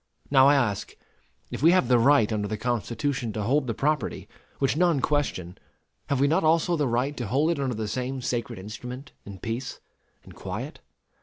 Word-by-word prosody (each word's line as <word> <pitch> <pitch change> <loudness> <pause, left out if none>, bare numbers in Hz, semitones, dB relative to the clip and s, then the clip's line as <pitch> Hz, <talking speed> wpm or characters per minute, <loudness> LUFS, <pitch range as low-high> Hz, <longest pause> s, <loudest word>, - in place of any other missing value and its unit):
Now 135 -1 +7
I 145 - +6
ask: 115 -8 -1 0.5
If - - -5
we 165 +4 +6
have 185 -9 +3
the 125 -1 +4
right 120 -3 +4
under 105 -1 -1
the 105 +1 -3
Constitution 120 +1 -2
to 105 - -3
hold 135 +5 +1
the 115 - -2
property 150 +4 -1 0.3
(which 135 0 +1
none 170 -3 +3
question), 115 - -1 0.5
have 140 - 0
we 140 - +4
not 165 +5 +2
also 165 +2 +3
the 150 -4 0
right 125 +5 0
to 120 - -3
hold 145 +9 +2
it 165 - -2
under 130 -3 -1
the 110 0 -3
same 130 +4 -3
sacred 120 -3 -3
instrument 125 +7 -8 0.2
in 100 -1 -8
peace 115 +6 -5 0.4
and - - -14
quiet? - - -6
130 Hz, 190 wpm, -26 LUFS, 115-145 Hz, 0.5 s, Now